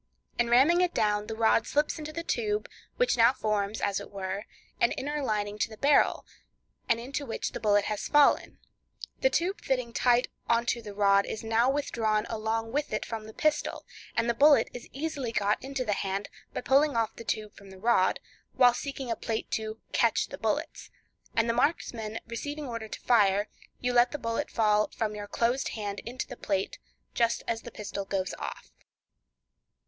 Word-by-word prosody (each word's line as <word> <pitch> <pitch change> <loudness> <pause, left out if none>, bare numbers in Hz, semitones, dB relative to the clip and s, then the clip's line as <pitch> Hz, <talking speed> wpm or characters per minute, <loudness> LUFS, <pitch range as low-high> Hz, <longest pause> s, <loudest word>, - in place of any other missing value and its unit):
In 240 0 +2
ramming 280 +9 +5
it 360 -1 +1
down, 210 -1 +1
the 220 - -4
rod 225 +1 +3
slips 295 +2 0
into 305 0 -6
the 335 +2 -5
tube, 420 +2 -1 0.3
which - - +2
now 235 +2 +6
forms, 215 -4 -1
as 200 -1 0
it 200 - -9
were, 195 +1 -4 0.3
an 235 - +3
inner 295 +2 -3
lining 210 -3 -1
to - - +1
the 220 - -11
barrel, 285 +4 +3 0.6
and 230 - +3
into 275 +4 -4
which 230 - -3
the - - -5
bullet 205 -2 +3
has 210 -1 -2
fallen; 295 -1 +4 0.6
the - - +4
tube 380 -1 0
fitting 250 -3 -1
tight 245 0 +3 0.2
on 235 0 +3
to 235 0 0
the 205 -3 -9
rod 200 -1 +4
is 220 - -5
now 225 +3 +3
withdrawn 225 -6 0
along 225 0 -2
with 290 +3 -1
it 215 - -2
from 225 -2 -5
the - - -9
pistol, 305 -1 0 0.3
and 230 0 +2
the 235 - +2
bullet 285 +4 +5
is 245 - -8
easily 280 -4 -3
got 210 -2 0
into 270 -1 -3
the 210 - +1
hand 195 0 -2 0.2
by - - -4
pulling 280 +2 +3
off 225 -1 0
the - - -9
tube 215 -1 -3
from 200 -1 -14
the 190 - -12
rod, 200 -2 +2 0.3
while 250 -2 +6
seeking 270 -1 -4
a - - +1
plate 220 0 -4
to 220 0 -3
"catch - - +2
the - - -7
bullets;" - - -2 0.5
and 230 0 +3
the 230 - +2
marksman 235 -5 -1
receiving 290 +6 -5
order 230 -3 -5
to - - -7
fire, 205 -3 +3 0.3
you 245 0 -1
let 240 0 +5
the 295 - -4
bullet 230 -4 -2
fall 210 -1 +2
from 215 -2 -2
your 205 -1 -6
closed 240 +5 0
hand 205 -1 -4
into 250 +2 -4
the 245 - -9
plate 195 -4 -2 0.3
just 235 -1 +1
as 225 -1 -1
the - - -8
pistol 205 -2 -5
goes 195 -1 -2
off. - - -7
230 Hz, 195 wpm, -29 LUFS, 210-265 Hz, 0.6 s, now